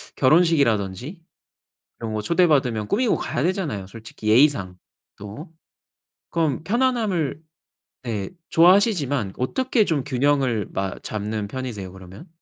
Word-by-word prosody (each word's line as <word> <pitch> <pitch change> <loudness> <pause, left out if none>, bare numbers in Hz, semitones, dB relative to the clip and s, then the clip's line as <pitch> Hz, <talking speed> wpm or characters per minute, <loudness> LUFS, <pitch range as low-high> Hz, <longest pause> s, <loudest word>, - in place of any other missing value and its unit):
결혼식이라든지 140 - +2 0.8
이런 115 -2 -5
거 110 - -2
초대받으면 130 - +2
꾸미고 240 +1 +2
가야 125 - -3
되잖아요, 165 - -2
솔직히 110 +1 -11
예의상 110 -7 +3 0.4
또. 105 - -9 0.8
그럼 160 -4 0
편안함을 215 - 0 0.6
네 105 -5 -3 0.2
좋아하시지만 165 - +3
어떻게 245 - +1
좀 155 -9 -1
균형을 135 -5 +1
마 95 -1 -3
잡는 105 -1 -4
편이세요 115 -7 -6
그러면? 95 - -12
130 Hz, 295 characters per minute, -23 LUFS, 105-165 Hz, 0.8 s, 예의상